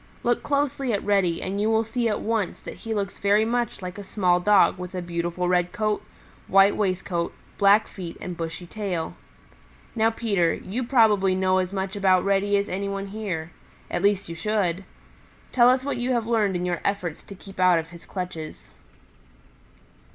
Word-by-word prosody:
Look 240 0 +1
closely 280 -2 0
at 200 - -1
Reddy 195 -5 +2
and 195 +2 -2
you 215 - +2
will 225 0 +3
see 230 +1 -1
at 210 - -1
once 220 -4 -1
that - - -7
he 225 - -7
looks 200 -2 -3
very 205 +2 +3
much 235 -3 -2
like 180 +2 -6
a - - -6
small 185 -3 +2
Dog 195 -1 +4
with 180 +1 -7
a 180 - -2
beautiful 175 +1 -2
red 180 0 +2
coat, 215 -1 -1 0.4
white 195 +1 +5
waistcoat, 185 -4 -1 0.2
black 205 +1 +5
feet 175 -4 -8
and 180 - -5
bushy 165 +1 -5
tail. 180 -4 -3 0.8
Now, 225 0 +3
Peter, 205 -7 +1
you 235 +7 -4
probably 215 -7 +4
know 185 0 +2
as 185 0 -2
much 190 0 -3
about 190 -2 +3
Reddy 200 +1 +2
as 200 - -1
any 200 +2 -3
one 195 0 -3
here. 185 -6 -4 0.4
At 175 - -1
least 200 0 +2
you 170 - -5
should. 190 0 -1 0.7
Tell 245 -1 +6
us 255 +1 +3
what 280 - -2
you 245 +1 0
have 235 -2 0
learned 215 -4 +1
in 180 0 -1
your 175 -1 -2
efforts 185 -5 -2
to 200 - -11
keep 195 0 -13
out 180 -2 +5
of 165 0 -3
his 170 -1 -13
clutches." 165 - -6
195 Hz, 190 wpm, -25 LUFS, 180-215 Hz, 0.8 s, Tell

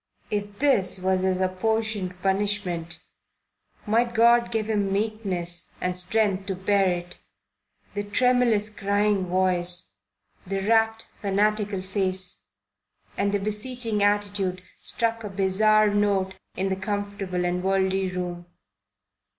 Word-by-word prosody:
If 205 -1 -3
this 200 -10 +2
was 185 0 +1
his 185 0 +1
apportioned 190 0 -1
punishment, 190 -4 -1 0.8
might 235 +2 +1
God 235 +1 +5
give 220 -2 -1
him 205 -3 0
meekness 195 -5 -2
and 180 0 -1
strength 195 +1 0
to 190 - -1
bear 195 +1 +2
it. 175 0 -5 0.7
The 205 0 -2
tremulous, 230 -1 +2
crying 200 -1 +1
voice, 180 -1 0 0.6
the 195 +1 -2
rapt, 225 0 +2 0.2
fanatical 205 -1 +1
face, 190 -1 -2 0.7
and 200 0 0
the 205 - +2
beseeching 215 +2 -2
attitude 200 -3 0 0.2
struck 230 -1 -1
a 210 - -4
bizarre 205 +2 +3
note 200 -2 +1 0.2
in 195 +1 -1
the 190 - 0
comfortable 200 -2 -3
and 175 0 0
worldly 190 0 +1
room. 175 -1 -5
200 Hz, 120 wpm, -25 LUFS, 185-215 Hz, 0.8 s, God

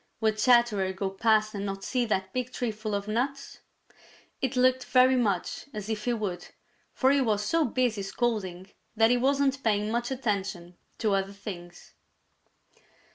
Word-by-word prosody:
Would 220 -1 +1
Chatterer 230 -6 +3
go 190 0 -3
past 215 +2 +2
and 200 -1 -4
not 195 -1 -4
see 250 +2 0
that 190 -3 -2
big 255 0 -2
tree 245 -3 -2
full 215 -1 -4
of 200 0 -3
nuts? 270 +6 -3 0.8
It 265 0 -1
looked 255 0 +3
very 255 0 +5
much 205 -8 -1
as 210 0 -5
if 215 -1 -3
he 245 - +1
would, 190 -6 -4 0.4
for 265 0 +2
he 280 0 +3
was 210 -4 0
so 325 +7 +2
busy 245 -3 0
scolding 195 -3 -2 0.2
that 225 +1 +4
he 245 - +4
wasn't 275 +1 +1
paying 210 -1 +1
much 240 +1 -1
attention 200 -8 -3 0.2
to 215 -3 +1
other 195 0 -1
things. 175 -4 -9
220 Hz, 165 wpm, -28 LUFS, 200-250 Hz, 0.8 s, very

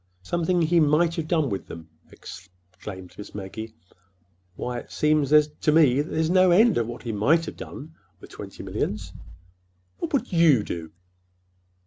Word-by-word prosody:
"Something 175 0 0
he 170 +2 +3
might 160 +2 +3
have 160 -2 -3
done 160 -5 +1
with 100 - -4
them!" 85 -1 -10 0.2
exclaimed 90 0 -11
Miss 105 - -10
Maggie. 105 +2 -7 0.8
"Why, 125 -1 -4
it - - -14
seems 150 -2 +1
to 150 0 +3
me 145 -4 +4
there's 160 +1 -1
no 185 0 +5
end 215 +6 +5
to 120 - +1
what 120 +1 -8
he 115 - -3
might 145 +11 +2
have - - -7
done—with 95 - -12
twenty 95 -1 -9
millions." 95 -1 -4 0.9
"What 335 - -4
would 270 -8 -1
you 160 -10 +5
do?" 80 -4 -6
145 Hz, 150 wpm, -25 LUFS, 100-165 Hz, 0.9 s, no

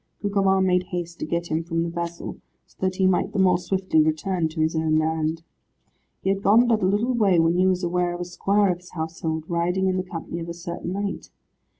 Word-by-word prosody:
Gugemar 195 -2 +2
made 180 -1 +2
haste 175 -1 -5
to - - -3
get 170 +1 -2
him 160 +1 0
from 165 0 -1
the 170 - -2
vessel, 170 0 -5 0.3
so - - -28
that 185 0 0
he 190 - +2
might 185 -1 +2
the - - -3
more 185 -2 +4
swiftly 185 -3 +1
return 160 +2 0
to 160 +1 -8
his 160 +1 +1
own 160 -1 +2
land. 160 +1 -1 0.8
He 190 - +2
had 195 0 -1
gone 220 +5 +5
but 225 -2 +2
a 185 - +2
little 215 +6 +1
way 205 -7 +3
when 165 0 +4
he 185 +1 +3
was 185 0 +1
aware 175 0 0
of 175 - -6
a - - -3
squire 195 +3 +2
of 175 - -4
his 180 - -17
household, 160 -1 -3
riding 175 +2 0
in 185 0 +1
the 185 - -1
company 170 -1 -6
of 165 0 -6
a 170 - -5
certain 170 0 -5
knight. 200 0 -4
175 Hz, 235 wpm, -24 LUFS, 165-190 Hz, 0.8 s, gone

